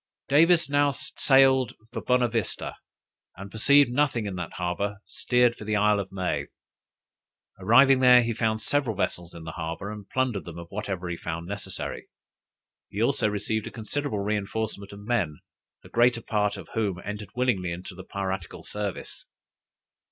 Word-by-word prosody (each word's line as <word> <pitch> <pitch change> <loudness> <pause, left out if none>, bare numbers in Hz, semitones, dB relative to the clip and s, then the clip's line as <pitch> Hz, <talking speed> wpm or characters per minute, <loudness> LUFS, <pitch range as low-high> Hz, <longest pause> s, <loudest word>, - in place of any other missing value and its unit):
Davis 165 +3 +5
now 145 0 +3
sailed 135 -2 +3 0.2
for 115 - -3
Bonavista, 120 -3 0 0.6
and 100 +2 -9
perceiving 140 +4 +4
nothing 130 -5 +1
in 100 - -3
that 90 -2 -5
harbor 95 +3 -2
steered 125 -1 +2
for - - -10
the 105 0 -1
Isle 105 0 +3
of 95 -1 -5
May. 95 -2 -2 1.1
Arrived 130 +7 +6
there, 125 -1 +8
he 115 0 -1
found 110 -1 -1
several 135 -7 0
vessels 85 -2 -2
in 85 - -9
the 80 - -6
harbor, 80 +6 -5
and 105 -2 -9
plundered 130 -6 0
them 85 -1 -8
of 85 0 -9
whatever 95 -3 -4
he 85 -1 -3
found 85 0 -5
necessary. 95 -1 -5 0.8
He - - -6
also - - +2
received 105 +1 -2
a - - -7
considerable 115 0 -3
reinforcement 105 0 -3
of 100 0 -10
men, 100 -11 0 0.5
the - - -14
greater 120 0 +3
part 105 -3 0
of - - -10
whom 100 -6 -1
entered 105 0 -5
willingly 115 -9 +1
into 90 +3 -7
the 95 +1 -10
piratical 95 -3 -4
service. 105 -2 -5
105 Hz, 160 wpm, -26 LUFS, 95-125 Hz, 1.1 s, there